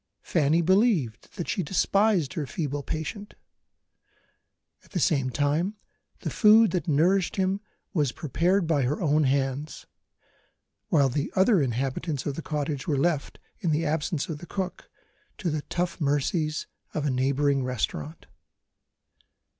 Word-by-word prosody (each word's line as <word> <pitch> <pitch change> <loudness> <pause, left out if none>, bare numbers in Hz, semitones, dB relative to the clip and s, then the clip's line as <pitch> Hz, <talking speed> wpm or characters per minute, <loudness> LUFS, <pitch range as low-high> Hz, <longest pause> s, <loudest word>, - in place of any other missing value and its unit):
Fanny 160 +1 +2
believed 185 - +1
that 175 -5 -4
she 190 - 0
despised 190 -1 +2
her 155 -6 -3
feeble 145 -3 -3
patient. 160 +8 -5 1.5
At - - -22
the 180 - 0
same 135 -5 +2
time, 150 - 0 0.5
the - - -3
food 220 0 +6
that 180 -5 -2
nourished 175 +5 +2
him 190 +1 0 0.3
was 150 -8 +1
prepared 175 +6 +1
by 160 -3 +2
her 135 +4 0
own 155 -2 +2
hands 135 +2 -1 1.0
while 140 -3 +4
the 140 +3 -2
other 190 -1 +4
inhabitants 135 +3 -2
of 145 - -1
the 165 - -5
cottage 150 -3 -3
were 145 -4 +1
left 150 0 0 0.2
(in 170 - -1
the 160 +2 +1
absence 150 0 -1
of 155 -3 -5
the 175 - -10
cook) 190 -2 -5 0.5
to 175 -5 -2
the 150 0 -1
tough 175 -1 -2
mercies 150 +2 0 0.3
of 150 - -1
a 145 - +1
neighbouring 135 +1 +1
restaurant. 100 -11 -3
155 Hz, 140 wpm, -26 LUFS, 140-180 Hz, 1.5 s, food